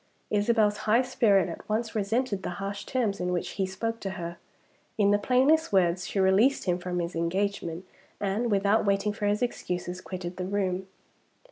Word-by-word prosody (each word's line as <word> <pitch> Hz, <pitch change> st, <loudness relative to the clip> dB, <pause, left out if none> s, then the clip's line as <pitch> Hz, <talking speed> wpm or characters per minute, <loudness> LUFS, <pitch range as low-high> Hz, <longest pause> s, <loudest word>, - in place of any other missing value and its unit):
Isabel's 210 Hz, 0 st, +2 dB
high 235 Hz, +4 st, +5 dB
spirit 205 Hz, -7 st, +3 dB
at 170 Hz, -, -8 dB
once 220 Hz, +1 st, -1 dB
resented 215 Hz, 0 st, 0 dB
the -, -, -4 dB
harsh 200 Hz, +1 st, -5 dB
terms 225 Hz, -6 st, -1 dB
in 180 Hz, 0 st, -1 dB
which 175 Hz, -1 st, -1 dB
he 195 Hz, -2 st, -2 dB
spoke 225 Hz, +4 st, -3 dB
to 195 Hz, -, -4 dB
her. 170 Hz, 0 st, -5 dB, 0.6 s
In 205 Hz, -2 st, +4 dB
the 205 Hz, -, +3 dB
plainest 265 Hz, +8 st, +3 dB
words, 180 Hz, -2 st, +2 dB
she 200 Hz, -, -2 dB
released 195 Hz, +8 st, +4 dB
him 180 Hz, -1 st, 0 dB
from 180 Hz, 0 st, -3 dB
his 170 Hz, 0 st, -3 dB
engagement, 175 Hz, 0 st, -2 dB, 0.3 s
and, 205 Hz, +4 st, 0 dB
without 200 Hz, +1 st, +3 dB
waiting 200 Hz, +1 st, +1 dB
for 205 Hz, -1 st, -2 dB
his 210 Hz, +4 st, +1 dB
excuses, 180 Hz, -6 st, -3 dB
quitted 180 Hz, -1 st, -6 dB
the 180 Hz, -, -3 dB
room. 190 Hz, -1 st, -1 dB
200 Hz, 175 wpm, -28 LUFS, 185-215 Hz, 0.6 s, high